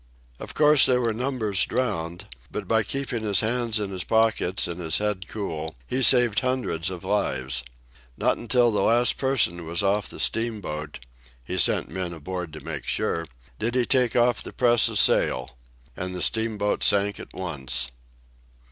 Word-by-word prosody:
"Of - - -9
course, 150 -2 +6
there 125 -1 +3
were 115 -2 0
numbers 115 -5 0
drowned, 85 -9 -3 0.2
but - - -6
by 110 0 +3
keeping 130 0 -3
his 105 -3 +1
hands 115 0 0
in 100 -2 -3
his 95 -2 -4
pockets 110 -5 +1
and 85 0 -6
his 80 -2 +1
head 105 -3 -2
cool 80 -7 -5
he 130 - -2
saved 125 -5 +5
hundreds 125 - -2
of 90 -1 -7
lives. 65 -11 -1 0.5
Not - - +1
until 120 0 +2
the 105 - 0
last 120 +4 +3
person 120 -11 +2
was 85 +4 -1
off 100 +1 0
the - - -10
steamboat—he 70 - -5
sent - - +4
men 90 -2 -4
aboard 90 +1 -6
to 75 -3 -10
make - - -6
sure—did 80 - -3
he 125 -2 +2
take 125 -3 +1
off 120 0 +3
the - - -8
press 120 -2 +4
of - - -2
sail. 65 0 +2 0.4
And 90 0 -5
the 90 - -2
steamboat 110 -2 0
sank 100 0 +2
at - - -10
once." 65 -8 -2
100 Hz, 165 wpm, -25 LUFS, 85-120 Hz, 0.5 s, course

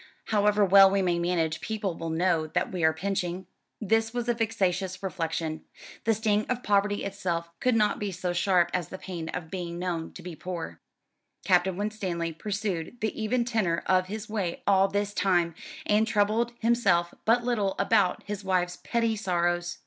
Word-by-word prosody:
"However 210 0 +4
well 195 0 +8
we 195 0 +1
may 175 -1 +1
manage, 170 -2 0
people 210 -5 -3
will 165 0 -5
know 165 -1 +1
that - - -1
we 180 -3 -3
are 160 - +6
pinching." 180 +1 -3 0.3
This 225 +2 +1
was 240 -1 -2
a 240 - +3
vexatious 190 -5 -1
reflection. 165 -3 -3 0.4
The 225 0 +3
sting 215 0 +1
of 250 0 -1
poverty 205 0 +1
itself 175 -4 -3
could 250 -2 +2
not 210 -2 +2
be 205 -1 -2
so 180 0 -3
sharp 175 -1 +2
as 180 -4 -1
the 190 - -7
pain 170 -4 -6
of 160 -2 -6
being 175 -2 -4
known 175 -2 -3
to 180 - -10
be 175 -2 -7
poor. 175 0 -6 0.7
Captain 185 -1 +3
Winstanley 190 -5 -2
pursued 200 +2 -3
the 220 - -1
even 235 +3 +1
tenor 215 -8 0
of 185 -1 +2
his 210 +2 -6
way 200 -6 -3
all 195 -1 +4
this 205 +1 -2
time, 175 -4 +2 0.3
and 215 -2 +3
troubled 225 +2 +1
himself 200 -8 +2
but 240 +2 +3
little 215 -6 0
about 195 -2 +2
his 205 -1 -5
wife's 180 -2 0
petty 230 -2 +1
sorrows. 175 -3 -1
190 Hz, 175 wpm, -27 LUFS, 175-210 Hz, 0.7 s, well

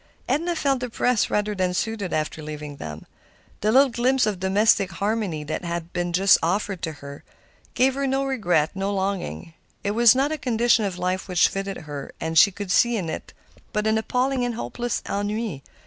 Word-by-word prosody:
Edna 330 +7 0
felt 275 -4 +1
depressed 250 -1 0
rather 210 0 0
than 185 -2 -1
soothed 215 -3 -2
after 155 0 -2
leaving 150 -1 -7
them. 75 - -8 0.5
The 215 - +1
little 270 +2 +5
glimpse 250 +2 +2
of 205 -4 -2
domestic 195 0 +2
harmony 200 -5 -2
which 155 - -3
had 170 -1 -4
been 175 0 -1 0.3
offered 190 +2 -1
her, 140 -3 -7 0.5
gave 260 +1 +3
her 275 +1 -1
no 270 +1 0
regret, 180 - +1
no 195 +1 -1
longing. 190 - -3 0.3
It 200 - 0
was 235 +2 +6
not 275 +3 +1
a 310 - -3
condition 240 -3 +2
of 190 -2 -3
life 185 +1 -2
which 180 -2 +4
fitted 195 0 -4
her, 145 -2 -7
and 160 0 -3
she 165 - +8
could 200 -1 -6
see 240 +3 +3
in 175 -5 -3
it - - -7 0.4
but 210 -1 0
an 220 0 +2
appalling 250 +3 0
and 245 -1 -1
hopeless 240 0 -3
ennui. 205 - -2
205 Hz, 180 wpm, -24 LUFS, 175-240 Hz, 0.5 s, she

